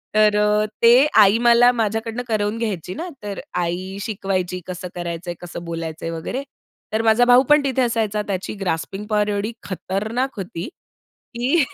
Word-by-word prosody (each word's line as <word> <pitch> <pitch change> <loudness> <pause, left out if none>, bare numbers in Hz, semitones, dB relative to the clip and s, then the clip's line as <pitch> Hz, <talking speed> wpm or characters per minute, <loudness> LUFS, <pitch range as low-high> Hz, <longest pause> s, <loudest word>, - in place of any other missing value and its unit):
तर 210 -1 +5
अ 210 0 +3 0.2
ते 230 0 +7 0.3
आई 205 +2 +6
मला 240 +1 +7
माझ्याकडून 225 +1 -2
करवून 215 0 0
घ्यायची 190 -6 -3
ना. 345 - -5 0.2
तर 200 -1 -5 0.2
आई 185 +3 -4
शिकवायची 190 -4 -2
कसं 180 0 -5
करायचंय, 175 0 -4
कसं 175 -1 -7
बोलायचंय 165 -1 -5
वगैरे. 165 +12 -4 0.5
तर 220 - +2
माझा 225 +2 +4
भाऊ 245 +1 +6
पण 295 -1 +6
तिथे 265 -1 0
असायचा. 220 -3 0
त्याची 190 0 -3
ग्रास्पिंग 195 +3 -3
पॉवर 210 -1 +2
एवढी 205 +2 -1
खतरनाक 215 +7 -3
होती, 180 +2 -5 0.7
की 265 +7 +2
210 Hz, 155 wpm, -21 LUFS, 185-230 Hz, 0.7 s, ते